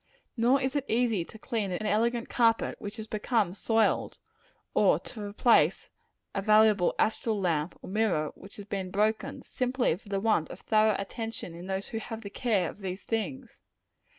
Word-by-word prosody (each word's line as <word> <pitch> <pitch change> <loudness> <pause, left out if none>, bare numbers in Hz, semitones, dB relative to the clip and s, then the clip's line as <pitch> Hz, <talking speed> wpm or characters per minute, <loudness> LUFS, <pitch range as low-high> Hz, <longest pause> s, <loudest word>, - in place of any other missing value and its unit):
Nor 250 +3 +3
is 265 +1 -2
it 285 -2 0
easy 225 -5 +1
to 220 - -13
clean 220 -4 -2
an 200 +4 -3
elegant 230 +3 +1
carpet 230 -2 +2
which 205 +2 -6
has 220 - -5
become 215 -3 0
soiled, 225 +2 +1 0.6
or - - +4 0.2
replace 210 +2 +2 0.4
a 195 - -1
valuable 215 -2 +4
astral 220 0 +1
lamp, 165 -3 -1
or - - -8
mirror, 195 -8 +1
which 195 - -14
has 205 - -9
been 195 -2 -4
broken, 210 +3 0
simply 250 -7 0
for 200 +3 -16
the 195 -1 0
want 210 -6 +1
of 175 - -9
thorough 215 -1 +3
attention 225 -2 -5
in 175 +2 -9
those 190 0 -3
who 225 - -3
have 225 0 -7
the 200 - -7
care 205 -8 +1
of - - -9
these 190 -1 -5
things. 235 +3 -4
215 Hz, 175 wpm, -29 LUFS, 195-230 Hz, 0.6 s, or